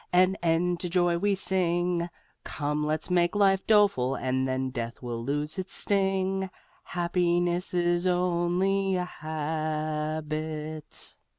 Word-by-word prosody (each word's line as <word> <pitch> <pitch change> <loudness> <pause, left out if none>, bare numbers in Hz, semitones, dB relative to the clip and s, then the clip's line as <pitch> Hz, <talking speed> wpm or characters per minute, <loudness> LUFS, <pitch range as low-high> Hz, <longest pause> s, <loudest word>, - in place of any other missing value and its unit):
An 185 +1 +4
end 170 +1 +1
to 180 - -2
joy 175 -1 +2
we 205 +2 +2
sing: 175 -2 0 0.3
Come 150 0 -2
let's 155 +4 -1
make 175 +1 +2
life 195 -2 +3
doleful 200 - +4
and 130 0 0
then 130 0 -1
death 120 -1 -5
will 120 -1 -4
lose 150 +6 -2
its 185 - -4
sting, 190 -1 +1 0.4
Happiness 175 0 0
is 175 0 +2
only 180 +2 +1
a 180 0 0
habit! 155 -1 -4
175 Hz, 120 wpm, -28 LUFS, 155-185 Hz, 0.4 s, An